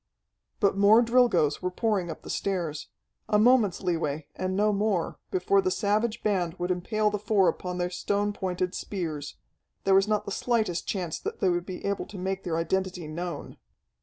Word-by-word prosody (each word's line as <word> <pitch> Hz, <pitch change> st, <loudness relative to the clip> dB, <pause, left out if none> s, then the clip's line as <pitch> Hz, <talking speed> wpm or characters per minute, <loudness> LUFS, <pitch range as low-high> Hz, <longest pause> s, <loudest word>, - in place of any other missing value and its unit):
But 200 Hz, -3 st, +3 dB
more 205 Hz, +4 st, +6 dB
Drilgoes 235 Hz, -, +3 dB
were 180 Hz, -, 0 dB
pouring 195 Hz, -2 st, 0 dB
up 160 Hz, -, -7 dB
the -, -, -9 dB
stairs. 170 Hz, -6 st, -2 dB, 0.4 s
A 210 Hz, -, +4 dB
moment's 215 Hz, -5 st, +4 dB
leeway, 160 Hz, -4 st, -1 dB
and 185 Hz, 0 st, -2 dB
no 210 Hz, +1 st, +3 dB
more, 200 Hz, -4 st, 0 dB
before 395 Hz, +1 st, +2 dB
the 375 Hz, -, 0 dB
savage 215 Hz, -, 0 dB
band 185 Hz, -5 st, 0 dB
would 180 Hz, 0 st, -2 dB
impale 210 Hz, +4 st, 0 dB
the 210 Hz, -, -2 dB
four 210 Hz, -3 st, +3 dB
upon 180 Hz, -1 st, -2 dB
their 180 Hz, 0 st, -1 dB
stone 205 Hz, +2 st, -1 dB
pointed 185 Hz, -2 st, -2 dB
spears. 160 Hz, -9 st, -4 dB, 0.5 s
There 195 Hz, -, +3 dB
was 195 Hz, +1 st, +5 dB
not 210 Hz, -1 st, 0 dB
the 200 Hz, -, -5 dB
slightest 220 Hz, -5 st, 0 dB
chance 180 Hz, -5 st, -2 dB
that -, -, -5 dB
they 190 Hz, -, +3 dB
would 175 Hz, 0 st, -1 dB
be 185 Hz, -2 st, -6 dB
able 200 Hz, 0 st, -2 dB
to 205 Hz, -, -9 dB
make 190 Hz, +1 st, -3 dB
their 165 Hz, -3 st, -1 dB
identity 180 Hz, 0 st, -1 dB
known. 170 Hz, +3 st, -5 dB
190 Hz, 185 wpm, -27 LUFS, 175-210 Hz, 0.5 s, more